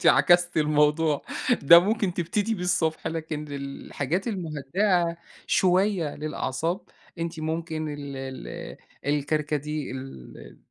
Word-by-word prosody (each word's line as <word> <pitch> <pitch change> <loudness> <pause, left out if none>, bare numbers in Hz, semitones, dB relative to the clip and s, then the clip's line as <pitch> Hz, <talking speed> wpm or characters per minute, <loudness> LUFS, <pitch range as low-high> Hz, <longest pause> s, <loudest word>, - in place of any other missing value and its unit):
أنتِ - - -1
عكستِ 175 -1 +5
الموضوع، 150 0 +3 0.4
ده 170 +4 +10
ممكن 200 -1 +1
تبتدي 205 +6 0
بيه 180 - -5
الصبح 160 -4 0
لكن 160 -2 -3
الحاجات 140 - -3
المُهدّئة 175 0 0 0.3
شوية 185 -3 +2
للأعصاب، 155 +3 -2 0.4
أنتِ 165 -1 -4
ممكن 160 0 -3
ال 145 -2 -6
ال 135 -1 -7 0.3
الكركديه، 150 -1 -1
ال 130 - -9
160 Hz, 105 wpm, -26 LUFS, 145-175 Hz, 0.4 s, ده